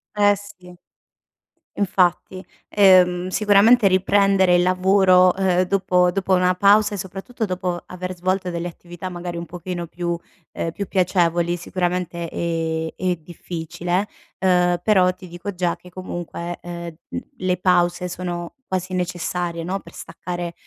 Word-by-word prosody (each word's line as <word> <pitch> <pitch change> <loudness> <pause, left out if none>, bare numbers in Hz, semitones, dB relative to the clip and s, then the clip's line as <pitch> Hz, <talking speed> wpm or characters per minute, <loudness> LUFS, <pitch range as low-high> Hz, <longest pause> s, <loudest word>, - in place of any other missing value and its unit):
Eh 205 0 +4
si. 185 -3 -13 1.0
Infatti. 185 -1 +1 0.3
Ehm, 185 -2 +5
sicuramente 210 +3 +5
riprendere 190 -1 +3
il 175 - +4
lavoro, 185 0 +4
ehm, 185 -1 +2
dopo 180 -1 +2
dopo 190 0 0
una 180 0 +3
pausa 205 +2 +4
e - - -3
soprattutto 195 +5 -5
dopo 180 -2 -3
aver 185 0 -6
svolto 185 0 -1
delle 170 +1 -3
attività, 175 +1 -8
magari 175 -1 -6
un 170 - -5
pochino 175 -1 -6
più, 170 0 -3 0.4
ehm 165 - -3
più 200 +2 -5
piacevoli, 175 -2 +1
sicuramente 175 -1 -3
è 160 -1 -2
è 180 -1 0
difficile, 175 +3 -4 0.3
ehm, 180 -2 +2
però 185 -4 +4
ti 185 0 -13
dico 175 +4 -6
già 175 -2 0
che 180 +1 -16
comunque, 175 -1 -6
ehm, 170 -1 -7
l - - -5 0.2
le 185 -1 0
pause 180 0 +2
sono 175 -1 -5
quasi 185 0 -3
necessarie, 175 -1 -2
no, 190 +3 -2
per - - -15
staccare 175 -1 -6
180 Hz, 140 wpm, -22 LUFS, 175-190 Hz, 1.0 s, Ehm